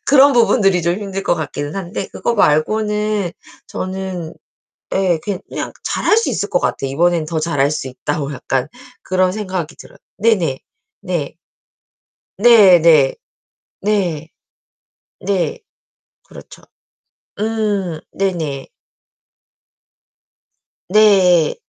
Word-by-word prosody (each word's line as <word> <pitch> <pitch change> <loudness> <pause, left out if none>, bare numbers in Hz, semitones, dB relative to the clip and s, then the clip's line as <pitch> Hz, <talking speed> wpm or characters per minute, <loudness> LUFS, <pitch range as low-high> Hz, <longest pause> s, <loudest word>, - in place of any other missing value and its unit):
그런 280 0 +6
부분들이 200 -7 +3
좀 170 +1 +1
힘들 195 -2 -5
것 - - +2
같기는 145 -1 -5
한데 190 0 -4
그거 235 - -1
말고는 210 +3 +1 0.4
저는 185 -3 -5 0.6
예 185 -4 +2
그냥 200 -3 -5
잘할 425 - +1
수 455 - +1
있을 - - -2
것 - - +1
같아요. 135 - -2
이번에는 170 +2 +1
더 160 -1 -2
잘할 145 -4 +1
수 135 - -4
있다고 145 +2 -4
약간 130 +1 -2 0.3
그런 185 0 +1
생각이 185 -6 -4
들어요. - - -15 0.2
네네. 195 -11 +1 0.4
네. 175 -7 -3 1.0
네 205 -5 +7
네. 155 -5 +5 0.7
네. 180 -7 -1 0.9
네. 195 - -1 0.7
그렇죠. - - -13 0.8
음 210 -6 -1
네네. 160 -8 -3 2.2
네. 185 -5 +4
185 Hz, 190 characters per minute, -18 LUFS, 160-210 Hz, 2.2 s, 네